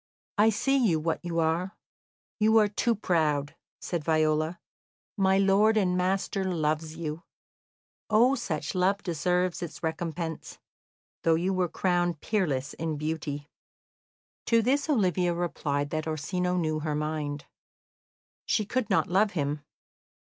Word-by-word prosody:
"I 215 +1 +6
see 270 +6 +1
you 170 -8 +3
what 160 +1 -2
you 170 -1 -3
are 165 +4 0 0.6
you 220 +1 +4
are 215 -1 +5
too 230 +3 0
proud," 155 -6 0 0.2
said 170 -4 -3
Viola. 155 +1 +1 0.6
"My 190 -2 +3
lord 200 +3 +4
and 185 -3 +2
master 190 +1 0
loves 155 -3 -1
you. 160 0 -4 0.9
Oh, 235 +5 +5
such 160 - -3
love 190 +2 +1
deserves 180 +1 0
its 170 -1 -7
recompense, 160 0 -4 0.6
though 165 -1 +3
you 180 +4 0
were 185 -2 0
crowned 175 -3 0
peerless 150 -11 -1
in 160 -2 -3
beauty." 150 -1 -4 1.0
To 230 -1 +4
this 280 +6 +1
Olivia 180 - +2
replied 145 -4 -2
that 155 0 -2
Orsino 180 +4 -1
knew 155 -3 0
her 155 -1 -2
mind; 150 -1 -3 1.0
she 215 - +1
could 240 +1 -1
not 195 - +3
love 195 +3 +2
him. 145 -2 -2
175 Hz, 135 wpm, -28 LUFS, 155-195 Hz, 1.0 s, I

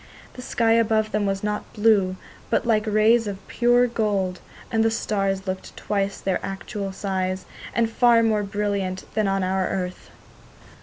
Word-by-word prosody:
The 250 - -9
sky 230 -2 +1
above 220 -1 +2
them 210 -1 0
was 195 0 -2
not 210 0 -3
blue, 205 -4 +3 0.3
but - - +1
like 220 -2 +2
rays 215 +2 +4
of 195 -1 -7
pure 240 +1 +3
gold, 205 -6 -1 0.3
and 225 -1 +2
the 225 - +3
stars 195 -3 -1
looked 185 -1 -5
twice 200 -1 -2
their 190 -2 -1
usual 195 0 -5
size, 190 -1 -2 0.3
and 230 -1 +3
far 235 0 +4
more 215 -2 +2
brilliant 200 -2 -2
than 215 -1 +1
on 195 0 0
our 190 0 0
earth. 185 -1 -4
205 Hz, 160 wpm, -24 LUFS, 195-225 Hz, 0.3 s, rays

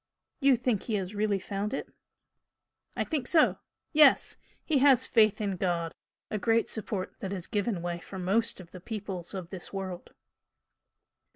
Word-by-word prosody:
"You 275 -3 +5
think 240 -4 0
he 225 - -2
has 190 -1 -3
really 210 -1 +1
found 200 +4 -3
it?" - - -4 1.1
"I - - +2
think 290 -6 -2
so, 320 -3 +4 0.3
yes! 300 -3 +5 0.3
He 300 -4 +2
has 260 -2 +5
faith 215 -4 +4
in 200 -3 -2
God 170 -3 -1 0.4
a 215 - -1
great 225 +2 +2
support 200 -3 -3
that 190 - -4
has 185 -4 -3
given 205 -4 -1
way 175 0 -3
for 170 +3 -9
most 195 +6 +1
of 175 -2 -12
the 185 - -10
peoples 195 -4 -5
of 180 -3 -6
this 185 -2 -7
world." 190 -2 -6
200 Hz, 165 wpm, -29 LUFS, 185-230 Hz, 1.1 s, You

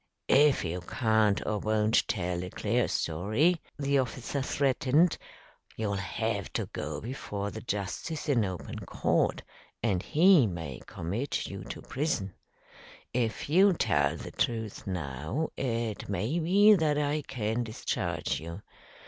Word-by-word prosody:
"If 145 -5 +5
you 90 +2 -3
can't 110 +1 +2
or 105 -1 0
won't 110 +1 +2
tell 90 -2 -1
a 90 - -5
clear 115 +3 0
story," 110 - +1 0.2
the 140 -1 +2
officer 130 +1 -2
threatened, 140 +5 +2 0.6
"you'll 105 -2 -1
have 100 +1 -2
to - - -1
go 75 -1 -4
before 105 -5 -4
the - - -7
justice 105 - -3
in 130 -6 +3
open 95 -3 -5
court, - - 0 0.4
and 100 -6 +1
he 165 - +5
may 80 -8 -6
commit 105 - -3
you - - -6
to - - -7
prison. 130 - -2 0.8
If 120 -2 -1
you'll 185 +5 +5
tell 75 - +2
the - - -8
truth 110 -4 -2
now, 85 - -3
it 115 -5 -2
may 110 - 0
be 200 +6 +6
that 155 -6 +2
I 150 +1 0
can 120 -3 -2
discharge 110 -9 -2
you. 85 +5 -8
110 Hz, 135 wpm, -29 LUFS, 95-140 Hz, 0.8 s, be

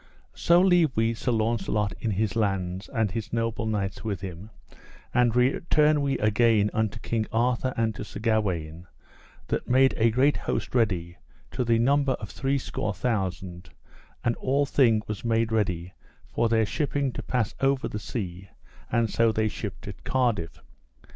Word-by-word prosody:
So 170 +1 +4
leave 175 -4 +4
we 115 +1 +2
Sir 125 +2 -2
Launcelot 110 -2 0
in 115 - -2
his 105 +1 -1
lands, 95 -3 -1
and 110 -6 0
his 115 +2 -5
noble 115 -1 -1
knights 100 -2 -2
with 100 -6 -3
him, 95 +2 -7 0.6
and 120 -1 +3
return 150 +4 +3
we 140 -1 0
again 110 0 +3
unto 110 -2 -1
King 110 -2 -1
Arthur 125 +2 +1
and 115 -1 +1
to - - -6
Sir - - -8
Gawaine, 90 -7 -1 0.6
that - - -2
made 130 +1 +5
a 115 0 +4
great 130 +6 +3
host - - -3
ready, 90 -8 0 0.3
to 125 - -1
the 115 -1 +2
number 140 +3 +2
of 105 -5 -7
threescore 135 0 -2
thousand; 95 -6 -3 0.5
and 120 - +1
all 140 +2 +1
thing 115 -6 +3
was 105 -2 -5
made 115 -1 +1
ready 90 -5 -1 0.3
for 115 - 0
their 110 -1 +3
shipping 140 +1 -1
to - - -6
pass 120 -5 -1
over 135 0 +2
the 105 - -5
sea, 95 -4 -6 0.4
and 115 -1 +2
so 115 +1 +2
they 110 0 0
shipped 105 - -6
at - - -9
Cardiff. 115 -11 -1
115 Hz, 160 wpm, -26 LUFS, 100-125 Hz, 0.6 s, made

